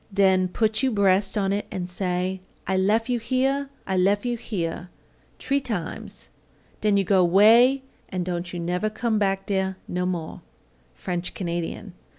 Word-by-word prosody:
Den 190 -2 +3
put 215 +3 0
you 265 - +2
breas' 200 -2 +2
on 195 -1 +1
it 205 - -2
and 180 -3 -4
say, 180 0 -2 0.2
'I 190 - 0
lef 215 +5 +2
you 245 -1 0
here, 265 +4 0 0.2
I 190 -1 -1
lef 200 +4 +2
you 240 -1 0
here,' 175 -6 -4 0.5
tree 280 +1 0
times, 205 -11 -5 0.5
den 210 -1 +3
you 200 - +3
go 190 0 +3
'way 230 +9 +6 0.3
and 185 -2 -3
don't 175 -1 -3
you 175 - -5
never 180 +5 -1
come 220 0 -1
back 195 -1 0
dere 190 -1 -1
no 180 0 -1
more." 170 -3 -4 0.6
_French 175 -1 -3
Canadian. 175 +2 -4
195 Hz, 160 wpm, -24 LUFS, 180-215 Hz, 0.6 s, way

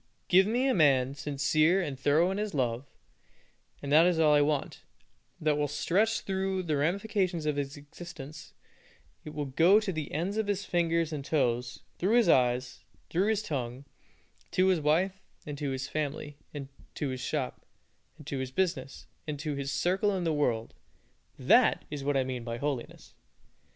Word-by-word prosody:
Give 190 +2 +6
me 245 +5 +1
a 265 - +3
man 135 -5 +3
sincere 150 +5 +2
and 150 -7 -2
thorough 145 +7 +2
in 195 - -2
his 210 -5 -3
love, 125 0 -1 1.0
and 140 - -4
that 160 +4 +7
is 180 -2 +2
all 155 -2 +5
I 145 - +5
want; 145 -1 -1 0.6
that 150 -1 +1
will 145 - +1
stretch 190 +10 +1
through 190 0 -2
all 185 - -2
the 155 -3 -1
ramifications 185 +1 0
of 150 -1 0
his 145 0 -3
existence; 150 -1 -10 0.7
it 150 -1 -9
will 150 -1 -2
go 170 +10 +5
to 210 -3 -3
the 155 -3 -4
ends 180 +7 -2
of 220 -2 0
his 200 -1 -1
fingers 165 -2 +1
and 145 -2 -4
his - - -12
toes, 125 -5 0 0.2
through 200 +6 +2
his 235 -7 +4
eyes, 125 -2 +2
and - - -35
through 185 +5 +2
his 215 -1 +1
tongue, 130 - -4 0.6
to 185 +1 +3
his 185 -3 +3
wife, 180 +6 +1 0.2
and 150 - -5
to 145 -2 -2
his 135 0 -3
family, 150 0 -4 0.6
to 145 - -2
his 130 -1 -4
shop, 140 -3 -3 0.5
and 150 - -13
to 140 -2 -3
his 130 -1 -3
business, 175 -2 -2 0.2
and 150 -1 -3
to 150 0 -3
his 140 0 -3
circle 190 +7 +1
in 180 - -2
the 165 -2 +1
world. 120 -6 0 0.6
That - - +4
is 145 -2 -4
what 140 0 +1
I 135 - +2
mean 130 -2 -4
by 115 0 -4
holiness! 140 -2 -5
150 Hz, 185 wpm, -29 LUFS, 140-180 Hz, 1.0 s, that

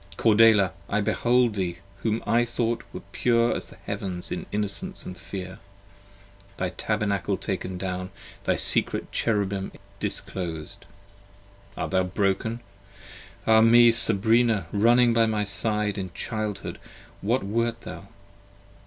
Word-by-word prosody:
Cordelia! 110 -3 +5 0.2
I 100 - +1
behold 120 +3 +2
20 95 -4 -2
Thee - - -18 0.2
whom 110 0 -1
I 120 +1 +3
thought 120 -1 -1 0.3
pure 120 -1 +2
as - - -6
the - - -14
heavens 90 -2 -4
in - - -4
innocence 105 -1 -3
& - - -14
fear: 95 -1 -7 1.0
Thy 90 - -1
Tabernacle 100 -1 -1
taken 95 -2 -4
down, 90 0 -4 0.3
thy - - +1
secret - - +2
Cherubim 100 -3 -1 0.3
disclosed. 85 +1 -5 0.9
Art - - -3
thou 95 -1 +3
broken? 100 +5 -1 0.8
Ah 110 0 +6
me, 120 +1 +7
Sabrina, 115 -1 +2
running 120 +3 +4
by 115 -1 +4
my 105 -1 0
side: 105 0 -1
In 95 -2 -5
childhood 110 -1 -4 0.4
what 115 +4 +1
wert 115 +3 -1
thou? - - -9
105 Hz, 125 wpm, -26 LUFS, 95-115 Hz, 1.0 s, me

